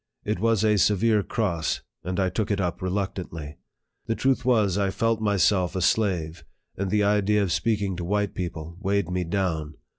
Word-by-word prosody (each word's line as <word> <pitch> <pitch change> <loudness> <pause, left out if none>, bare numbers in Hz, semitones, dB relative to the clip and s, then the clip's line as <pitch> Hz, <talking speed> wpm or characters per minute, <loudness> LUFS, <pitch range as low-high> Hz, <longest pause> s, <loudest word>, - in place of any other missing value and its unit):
It - - -1
was 115 0 +2
a 105 -1 +3
severe 105 +2 +3
cross, 95 -7 -1 0.2
and 90 +2 -3
I 95 -1 +2
took 105 +2 -2
it 100 -1 0
up 90 +1 -2
reluctantly. 90 -5 -4 0.5
The 115 - 0
truth 135 +2 +1
was, 110 -7 +3
I 100 -1 +1
felt 115 +3 0
myself 100 -3 +2
a 95 - -1
slave, 90 -5 0 0.3
and 100 0 -2
the 105 +1 +2
idea 105 0 +3
of 95 - -1
speaking 100 +2 0
to 90 - -4
white 100 +2 0
people 85 -2 -5
weighed 100 -1 0
me 90 0 0
down. 80 -4 -2
100 Hz, 180 wpm, -25 LUFS, 90-105 Hz, 0.5 s, a